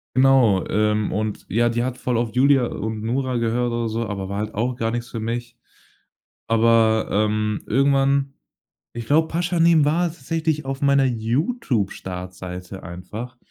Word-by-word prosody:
Genau. 130 -7 +4
Ähm, 105 0 +1
und 105 +1 -3
ja, 120 +4 +2
die 120 +1 -1
hat 130 0 -3
voll 125 -2 -1
auf 115 -1 -1
Julja 135 -1 +4
und 110 0 -4
Nura 125 +2 -1
gehört 120 +1 0
oder 115 -1 -1
so, 115 +1 -2
aber 100 -2 -4
war 100 +1 -4
halt 110 +1 -4
auch 120 +4 -1
gar 115 -1 -1
nix 120 0 -4
für 115 - -5
mich. 120 +1 -4 0.9
Aber, 115 -1 +3
ähm, 105 0 0
irgendwann, 140 +1 +2 0.6
ich 120 -1 -6
glaube, 160 +2 +3
„Pashanim“ 170 -2 +3
war 170 +4 +2
tatsächlich 160 -1 -2
auf 135 0 -4
meiner 140 -1 +4
Youtube-Startseite 100 - -3
einfach. 105 +8 -8
120 Hz, 150 wpm, -22 LUFS, 110-135 Hz, 0.9 s, Genau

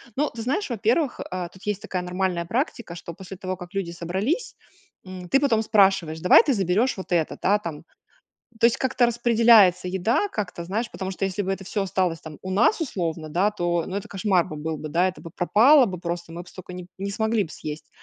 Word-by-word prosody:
Но 295 +2 +1
ты 230 - -8
знаешь, 280 - -1
во-первых, 240 +5 0
э, 180 -1 -4
тут 190 - -17
есть 210 -1 -2
такая 185 - -3
нормальная 180 -1 -1
практика, 230 - -3
что 170 -1 -8
после 190 +1 -10
того 185 -1 -4
как 175 +1 -10
люди 195 -4 -2
собрались, 190 - -2 0.5
м, 185 -1 -8
ты 270 - +4
потом 235 -6 +2
спрашиваешь, 190 -7 +3
давай 180 +6 +7
ты 275 - +1
заберешь 200 +4 +1
вот 190 - -8
это, 165 -3 0
да, 205 +2 +3
там. 165 -5 -7 0.8
То 230 - +7
есть 235 - +2
как-то 255 -2 +2
распределяется 230 -6 +5
еда, 190 - +1
как-то 180 - -5
знаешь, 215 +6 -3
потому 190 0 -5
что 195 - -3
если 195 +1 -2
бы 190 - -3
это 195 0 -5
всё 200 +2 -2
осталось, 180 -3 -1
там, 155 -2 -10
у 185 - -5
нас, 220 - +3
условно, 165 - -3
да, 185 +7 +2
то, 175 -4 -1
ну 190 - -4
это 200 - -5
кошмар 190 -2 +1
бы 155 - -7
был 155 +1 -3
бы, 155 - -6
да. 175 +5 +3
Это 185 - -7
бы 165 - -9
пропало 240 +9 +5
бы 180 -3 -5
просто, 170 -1 -5
мы 170 +1 -6
б 180 - -16
столько 185 -1 -11
не 180 - -6
п - - -19
не 200 +1 -3
смогли 220 0 0
б 160 - -12
съесть. 150 0 -7
190 Hz, 225 wpm, -24 LUFS, 175-220 Hz, 0.8 s, давай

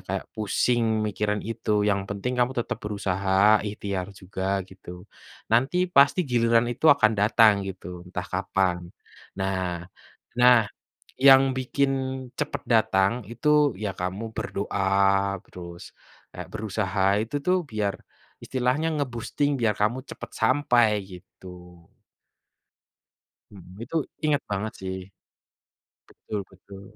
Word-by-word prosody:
kayak - - -3
pusing 110 +1 +1
mikirin 105 0 -2
itu, 110 -1 -1
yang 100 -1 0
penting 105 +5 -3
kamu 125 +1 +2
tetap - - -5
berusaha, 100 0 +2
ikhtiar 100 -2 -4
juga 95 +1 -3
gitu, 90 -1 -12 0.5
nanti 145 +11 +2
pasti 140 +1 +5
giliran 115 -1 +3
itu 125 - -1
akan 115 -6 +3
datang 105 -1 +4
gitu, 90 -2 -8
entah 90 0 -5
kapan, 90 -2 -1 0.5
nah 95 -3 -2 0.5
nah 120 -3 +6 0.5
yang 135 0 +7
bikin 135 +2 0 0.5
cepat 150 0 -3
datang 100 -4 +3 0.2
itu 145 +3 +2
ya 105 -2 -3
kamu 95 +5 -4
berdoa 100 -2 0
terus 85 -1 -10 0.4
kayak 90 -1 -8
berusaha 105 -2 -2 0.2
itu 115 +5 -4
tuh 180 -1 +2
biar 105 -2 -1 0.5
istilahnya 130 +5 0
nge-boosting 140 +2 -1
biar 110 -3 +2
kamu 120 +5 0
cepat - - -9
sampai." 125 -5 +3 0.3
gitu. 90 -2 -14 1.7
Mhm, 95 0 -14
itu 150 +8 -5 0.3
ingat 150 -1 +2
banget 105 +2 -2
sih. 95 0 -4 1.1
Betul 105 -2 -6
betul, 95 +1 -14
105 Hz, 115 wpm, -25 LUFS, 95-120 Hz, 1.7 s, yang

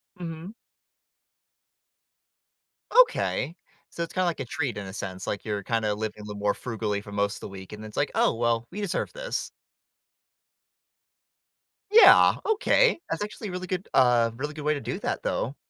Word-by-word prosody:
Mhm. 175 +3 -7 2.5
Okay. 170 - -2 0.3
So 170 - -4
it's 170 - -7
kinda 185 -1 +1
like 170 -2 -1
a 135 - -3
treat 125 -3 -3
in 100 - -5
a 95 - -8
sense, 95 -3 -6
like, 100 - -3
you're 105 -2 -2
kinda 110 -1 0
living 105 0 -5
a - - -9
little 105 -1 -7
more 105 0 +2
frugally 110 -4 -3
for 105 - -11
most 100 0 -1
of - - -11
the - - -7
week, 95 -1 -10
and 105 0 -8
it's 105 - -11
like, 145 - +1
"Oh - - +3
well, 115 0 0
we 200 - -6
deserve 200 -4 -2
this." - - -4 2.4
Yeah, 450 +2 +8
Okay, 445 +1 +3
that's - - -2
actually 210 +1 -6
a - - -5
really 180 0 -5
good 185 0 -3
uh, 120 -3 +4
really 145 +5 -4
good 150 -1 -7
way 150 - +3
to 145 - -4
do - - -4
that - - -3
though. 135 +5 -2
120 Hz, 180 wpm, -26 LUFS, 105-175 Hz, 2.5 s, Yeah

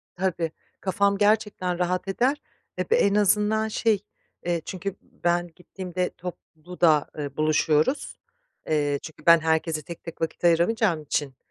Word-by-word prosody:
Tabii, 175 -3 -1 0.3
kafam 200 +1 +1
gerçekten 205 -4 +1
rahat 180 +1 0
eder, 255 +9 +1 0.4
eb - - -3
en 205 - +4
azından 210 +2 +3
şey, 220 -1 +1 0.5
eee, 170 -2 0
çünkü 195 +1 -4
ben 175 0 -1
gittiğimde 180 0 -4
toplu 180 -1 -10
da, 155 -4 +5
eee, 145 -1 -5
buluşuyoruz, 155 - +1 0.5
eee, 145 -2 +1
çünkü 160 - -11
ben 170 0 +8
herkese 160 0 0
tek 170 +3 -10
tek 165 -1 -9
vakit 165 +2 -3
ayıramayacağım 175 +1 +3
için, 145 -2 -2
175 Hz, 135 wpm, -25 LUFS, 160-200 Hz, 0.5 s, ben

